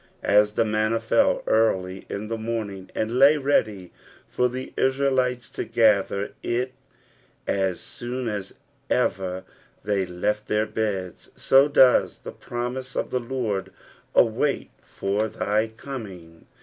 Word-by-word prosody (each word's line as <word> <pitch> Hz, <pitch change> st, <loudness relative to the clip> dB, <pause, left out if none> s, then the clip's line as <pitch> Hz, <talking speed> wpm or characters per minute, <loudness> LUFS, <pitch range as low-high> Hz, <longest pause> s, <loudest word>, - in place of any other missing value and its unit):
As 105 Hz, 0 st, +4 dB
the 115 Hz, -, +2 dB
manna 110 Hz, +1 st, +1 dB
fell -, -, +2 dB
early 95 Hz, -4 st, +1 dB
in 100 Hz, +2 st, -4 dB
the 115 Hz, +1 st, -3 dB
morning, 110 Hz, -4 st, -4 dB
and 115 Hz, +3 st, -1 dB
lay 140 Hz, +3 st, +7 dB
ready 110 Hz, -10 st, 0 dB, 0.4 s
for 125 Hz, 0 st, +1 dB
the 130 Hz, +1 st, -6 dB
Israelites 130 Hz, -2 st, +1 dB
to -, -, -4 dB
gather 105 Hz, -3 st, +2 dB
it 125 Hz, +2 st, -1 dB, 0.7 s
as 95 Hz, -3 st, 0 dB
soon 125 Hz, +1 st, -5 dB
as 105 Hz, -3 st, -4 dB, 0.3 s
ever 95 Hz, 0 st, 0 dB, 0.4 s
they 100 Hz, -2 st, 0 dB
left 105 Hz, +4 st, -2 dB
their 105 Hz, 0 st, +1 dB
beds, 100 Hz, -5 st, -3 dB
so 135 Hz, +2 st, +5 dB
does 130 Hz, -3 st, +4 dB
the -, -, -9 dB
promise 125 Hz, +2 st, -5 dB
of -, -, -2 dB
the 125 Hz, -, +1 dB
Lord 115 Hz, -5 st, -3 dB, 0.4 s
wait 125 Hz, +5 st, +2 dB
for 100 Hz, +3 st, -2 dB
thy 105 Hz, +1 st, 0 dB
coming. 105 Hz, -9 st, -9 dB
110 Hz, 130 wpm, -24 LUFS, 100-125 Hz, 0.7 s, lay